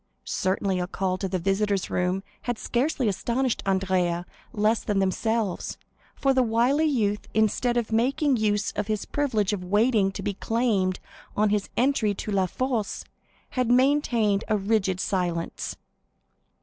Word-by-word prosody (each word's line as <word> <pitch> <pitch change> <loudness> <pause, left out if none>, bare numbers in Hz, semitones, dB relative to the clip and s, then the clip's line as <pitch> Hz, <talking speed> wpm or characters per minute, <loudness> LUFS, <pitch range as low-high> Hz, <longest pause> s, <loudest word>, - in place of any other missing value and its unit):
Certainly 190 0 0
a 180 - -2
call 185 0 -2
to 195 - -1
the 185 - 0
visitors' 195 +2 0
room 180 +2 0 0.3
had 240 - 0
scarcely 255 +2 0
astonished 235 +5 0
Andrea 185 -2 +1 0.3
less 215 +2 +1
than 205 - -1
themselves, 200 +2 -1 0.4
for 270 -1 +2
the 260 - +3
wily 245 +6 +2
youth, 210 -8 0
instead 220 +3 +2
of 230 -2 -1
making 275 +5 +2
use 210 -1 +1
of 210 0 -3
his 215 -2 -2
privilege 220 -8 0
of 190 -3 -3
waiting 205 +1 +2
to - - -6
be 205 - -1
claimed 200 -3 0 0.4
on 210 0 +3
his 210 -1 0
entry 250 -4 +2
into 205 +1 -3
La 190 -2 +2
Force, 240 0 -2 0.4
had 250 -2 -1
maintained 245 -6 +3
a 215 - +2
rigid 195 -2 0
silence. 175 -4 -2
210 Hz, 150 wpm, -26 LUFS, 195-240 Hz, 0.4 s, the